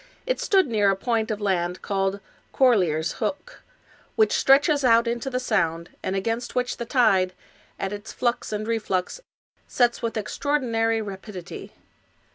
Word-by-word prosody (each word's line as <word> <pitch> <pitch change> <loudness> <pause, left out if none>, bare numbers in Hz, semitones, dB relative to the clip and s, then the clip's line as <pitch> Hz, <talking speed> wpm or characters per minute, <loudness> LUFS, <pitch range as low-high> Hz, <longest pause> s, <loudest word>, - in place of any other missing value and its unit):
It - - -1
stood 385 -2 +3
near 215 -6 +2
a 195 - +2
point 225 +2 -1
of 215 -2 -2
land 180 -3 -1
called 195 0 -1 0.3
Corlear's 180 - +3
Hook,^ 290 - -4 0.6
which 435 - +3
stretches 285 +2 +4
out 230 -1 +5
into 235 +2 -2
the 255 -1 -1
Sound, 170 -9 -1
and 190 - -2
against 225 +5 -2
which 250 0 -1
the 235 - -4
tide, 200 -7 +3 0.5
at 195 +1 -3
its 205 +1 -7
flux 240 -2 -1
and 215 0 -3
reflux, 220 - -2 0.5
sets 240 -1 +1
with 230 -1 -2
extraordi 285 +7 -1
nary 225 -2 0
rapidity. 195 -2 -8
225 Hz, 150 wpm, -24 LUFS, 195-250 Hz, 0.6 s, out